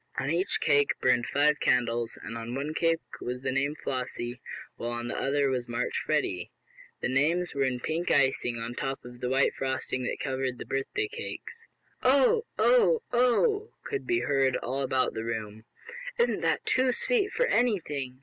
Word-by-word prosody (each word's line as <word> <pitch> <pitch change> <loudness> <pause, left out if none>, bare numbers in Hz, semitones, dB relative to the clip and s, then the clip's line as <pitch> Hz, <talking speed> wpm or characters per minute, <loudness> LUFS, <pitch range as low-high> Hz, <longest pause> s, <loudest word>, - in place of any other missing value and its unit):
On 135 - 0
each 175 +4 +1
cake 145 -2 +3
burned 125 -1 +3
five 150 +1 +3
candles, 120 -2 +1
and 115 - -6
on 115 +1 -5
one 145 +3 -3
cake 165 0 +1 0.2
was 125 +1 -4
the 130 - 0
name 140 +3 0
"Flossie," 125 -3 -4 0.3
while 120 0 -4
the 120 - -4
other 140 0 +1
was 125 -2 -2
marked 120 0 -2
"Freddie." 90 -1 -1 0.5
The - - 0
names 160 +7 +1
were 140 -1 +1
in 125 -1 -1
pink 165 +6 -2
icing 130 -3 +2
on 115 +1 -4
top 135 +1 -4
of 125 0 -10
the 125 - -2
white 135 +2 +3
frosting 130 -1 -2
that - - -3
covered 130 -2 -2
the - - -7
birthday 135 - -2
cakes. 460 +2 -7 0.3
"Oh! 280 - +4
Oh! 485 -1 +4
Oh!" 405 - +2
could 415 -2 -4
be 355 0 +2
heard 135 -2 +2
all 135 +3 -3
about 130 -1 +1
the 110 - -4
room. 110 -1 -5 0.5
"Isn't 475 0 +2
that - - 0
too 255 0 +3
sweet 410 - +1
for - - +2
anything!" 150 - 0
135 Hz, 175 wpm, -28 LUFS, 125-180 Hz, 0.5 s, Oh